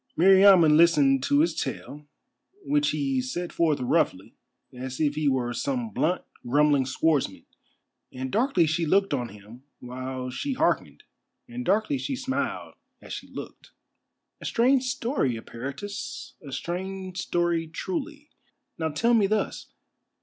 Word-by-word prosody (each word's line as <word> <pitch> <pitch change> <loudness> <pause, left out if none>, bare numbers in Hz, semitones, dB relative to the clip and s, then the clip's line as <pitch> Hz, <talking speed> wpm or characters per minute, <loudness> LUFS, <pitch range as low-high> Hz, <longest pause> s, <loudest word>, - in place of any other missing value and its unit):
Meriamun 190 -3 +7
listened 145 -5 +5
to 145 +2 +3
his 165 +1 +2
tale, 150 -1 -5 0.6
which 295 +1 +2
he 135 -3 0
set 170 +8 -4
forth 160 -3 +2
roughly, 125 - 0 0.4
as 130 +1 -6
if 150 -2 +2
he 150 0 -1
were 125 -2 -1
some 245 - -2
blunt, 180 -1 0 0.2
grumbling 145 +1 +3
swordsman, 135 -6 0 0.7
and 130 0 -5
darkly 230 -7 +2
she 160 +2 0
looked 195 +1 +2
on 120 -4 -2
him 105 +4 -14 0.2
while 130 +1 -6
she 275 - -3
hearkened, - - 0 0.4
and 245 +1 -6
darkly 220 +7 +1
she 275 - -3
smiled 265 +1 -3 0.3
as - - -9
she - - -7
looked. - - -10 0.7
"A - - -8
strange 255 +2 +3
story, 250 - -1
Eperitus, 140 - -7
a 140 - -10
strange 185 +4 -5
story 170 -1 0
truly. 295 - -5 0.5
Now 160 -1 0
tell 230 +11 +1
me 215 -4 +4
thus. 215 +1 -2
165 Hz, 135 wpm, -26 LUFS, 135-215 Hz, 0.7 s, Meriamun